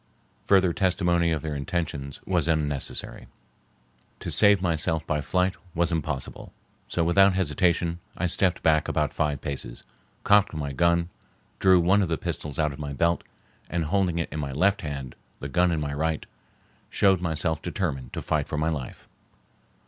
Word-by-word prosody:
Further 95 -3 +4
testimony 90 -3 +1
of 80 -2 -1
their 80 -1 -3
intentions 70 -1 -4
was 85 -4 0
unnecessary. 75 -4 -2 0.9
To - - -4
save 100 -1 +5
myself 80 -2 0
by 75 -1 -1
flight 90 +5 +1 0.2
was 85 +1 +1
impossible, 75 -4 -4 0.4
so 85 - 0
without 95 +3 +4
hesitation 85 -1 +1 0.2
I 90 - -1
stepped 90 0 +1
back 80 -1 +3
about - - 0
five 75 -3 -1
paces, 65 -4 -4 0.4
cocked 100 -4 +4
my 70 -2 -3
gun, 85 +3 +2 0.5
drew 95 -1 +5
one 95 +4 +4
of 95 - 0
the 80 - 0
pistols 75 -3 -5
out 75 -2 +1
of 70 - -11
my 75 -1 -5
belt, 85 +4 +1 0.5
and 85 0 -1
holding 90 0 +1
it 85 - -2
in 75 - -4
my 70 -2 -3
left 95 +7 +2
hand, 70 -5 -5 0.3
the 70 - -5
gun 90 +5 +2
in 80 - 0
my 70 -1 -3
right, 80 +1 -1 0.6
showed 95 -2 +3
myself 80 -2 0
determined 75 -8 -3
to - - -4
fight 75 -2 0
for 75 - -4
my 80 +2 +1
life. 70 -6 -6
80 Hz, 165 wpm, -26 LUFS, 75-90 Hz, 0.9 s, save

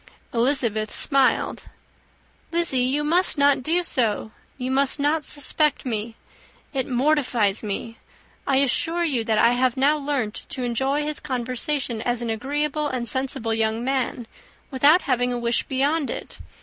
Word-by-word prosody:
Elizabeth 235 -3 +1
smiled. 275 -3 +2 0.9
"Lizzy, 335 -6 +1
you 265 +4 +1
must 340 +3 +3
not 280 -1 +3
do 335 +6 +1
so. 220 -7 0 0.3
You 255 0 -3
must 275 +2 +2
not 295 +2 +1
suspect 300 0 +1
me. 225 -2 -3 0.6
It 265 -2 -1
mortifies 250 -6 +1
me. 225 +2 -5 0.5
I 270 - +2
assure 325 +6 +1
you 270 -9 0
that 220 -1 0
I 235 - +5
have 250 +1 +1
now 290 +3 +3
learnt 275 -7 -2
to 255 - -5
enjoy 265 +5 0
his 300 0 -3
conversation 255 -2 -2
as 245 0 -1
an 230 - -2
agreeable 295 +6 -2
and 250 -4 -3
sensible 235 -2 -1
young 220 +1 0
man 255 -2 -2 0.5
without 285 +7 +4
having 250 -2 0
a 245 - -2
wish 235 0 0
beyond 280 +3 0
it. - - -7
260 Hz, 150 wpm, -23 LUFS, 235-290 Hz, 0.9 s, I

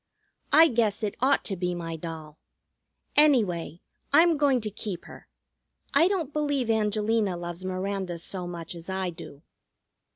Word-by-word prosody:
I 320 +3 +8
guess 225 -5 0
it 205 - -1
ought 265 +2 +3
to 195 - -2
be 180 0 -2
my 165 -1 -5
doll. 160 -2 -8 0.8
Anyway, 205 - +3 0.3
I'm 330 +3 +6
going 280 -3 +3
to 215 -1 -3
keep 200 -3 -6
her. - - -13 0.7
I 335 - +5
don't 345 -7 -2
believe 285 -6 0
Angelina 215 -2 +1
loves 175 +1 -6
Miranda 185 -1 -3
so 180 +2 -6
much 170 -1 -6
as 170 +1 -10
I 190 -1 -1
do." 150 -3 -12
200 Hz, 150 wpm, -27 LUFS, 175-255 Hz, 0.8 s, I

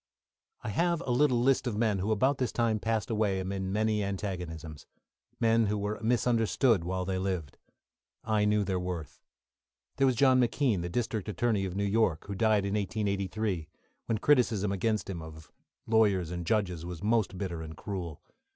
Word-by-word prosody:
I - - -3
have 170 - +1
a 130 - -3
little 125 -1 +3
list 130 +1 +2
of 110 -4 -2
men 110 -3 +1
who 100 +4 -1
about 130 +6 +2
this 125 - 0
time 115 -2 +1
passed 115 +2 -1
away 105 -3 +1
amid 95 +1 -3
many 105 +2 0
antagonisms 90 -6 -5 0.5
men 115 -1 +3
who 105 +1 0
were 105 +1 -3
misunderstood 115 -2 +2
while 90 +1 -2
they 95 0 -1
lived. 90 -6 -3 0.6
I 110 -2 +1
knew 105 0 +2
their 95 -2 -1
worth. 90 -3 -5 0.8
There 135 - +4
was 130 - +2
John 130 +1 +5
McKean, 120 -5 +1
the 85 - -3
District 110 0 -2
Attorney 105 -2 0
of 90 -1 -5
New 100 - 0
York, 100 -6 +1
who 100 - -5
died 105 0 +2
in 100 - -2
1883, 100 -3 -2 0.4
when 115 - +1
criticism 110 -6 +2
against 110 +2 0
him, 90 -4 -5
of 80 0 -11 0.3
lawyers 100 -6 +2
and 85 -1 -5
judges, 90 -6 0
was 90 +1 -7
most 105 -3 +1
bitter 90 -4 -4
and 80 -1 -8
cruel. 85 -2 -6
105 Hz, 175 wpm, -30 LUFS, 95-115 Hz, 0.8 s, John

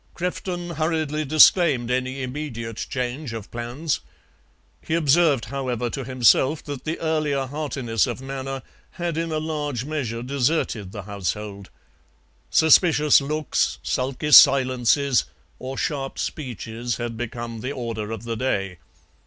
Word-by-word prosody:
Crefton 175 0 -3
hurriedly 155 -1 0
disclaimed 150 -4 +5
any 130 +1 -1
immediate 125 -5 -5
change 125 +1 -3
of 110 -3 -7
plans; 120 +6 -3 0.8
he 160 - -2
observed, 155 -4 +3
however, 125 -3 -3
to 135 - -4
himself 130 +4 +3
that 145 -3 -7
the 160 +1 -2
earlier 155 -4 0
heartiness 130 -6 -1
of - - -4
manner 135 0 -5 0.3
had 175 -2 -3
in 165 0 -2
a 155 - 0
large 150 -5 -3
measure 125 -7 -3
deserted 125 - -1
the 100 -1 -7
household. 100 0 -5 0.8
Suspicious 155 -2 +5
looks, 150 +1 -1
sulky 135 +4 -2
silences, 130 -1 +6 0.3
or 130 +1 -6
sharp 135 -3 -3
speeches 120 -4 -4
had 120 -1 -4
become 115 0 -5
the 125 +5 -4
order 115 -5 -4
of 115 +1 -5
the 115 -1 -3
day. 95 -7 -2
135 Hz, 130 wpm, -23 LUFS, 120-150 Hz, 0.8 s, silences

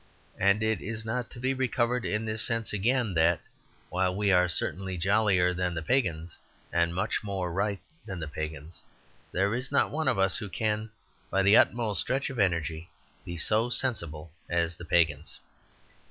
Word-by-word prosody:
And 100 +3 +3
it 110 -2 0
is 110 +1 -5
not 115 +2 -2
to 120 - -11
be 130 +2 0
recovered 125 -2 0
in 105 +2 0
this 110 0 -1
sense 115 -3 0
again 115 +1 +1
that, 80 0 +3 0.5
while 90 +1 0
we 100 0 +2
are 90 -1 +4
certainly 95 +2 -2
jollier 95 -1 +3
than 90 -1 -1
the 80 - -3
pagans, 85 -7 -1 0.3
and 85 0 +1
much 105 +5 -1
more 95 -4 -3
right 100 +2 -1 0.3
than 95 -4 -5
the 80 - -4
pagans, 80 +1 -6 0.5
there 100 +3 +1
is 125 +3 -3
not 140 - +3
one 155 0 -2
of 130 - +2
us 95 0 +3
who 105 -4 -6
can, 110 +2 -1 0.4
by 95 +1 +1
the 100 +2 +6
utmost 115 -5 +3
stretch 135 +2 -1
of 125 - -6
energy, 85 -4 0 0.4
be 85 - -6
so 110 +8 +2
sensible 85 - -2 0.2
as 85 -1 0
the 85 - -10
pagans. 80 -3 +1
95 Hz, 175 wpm, -28 LUFS, 85-110 Hz, 0.5 s, the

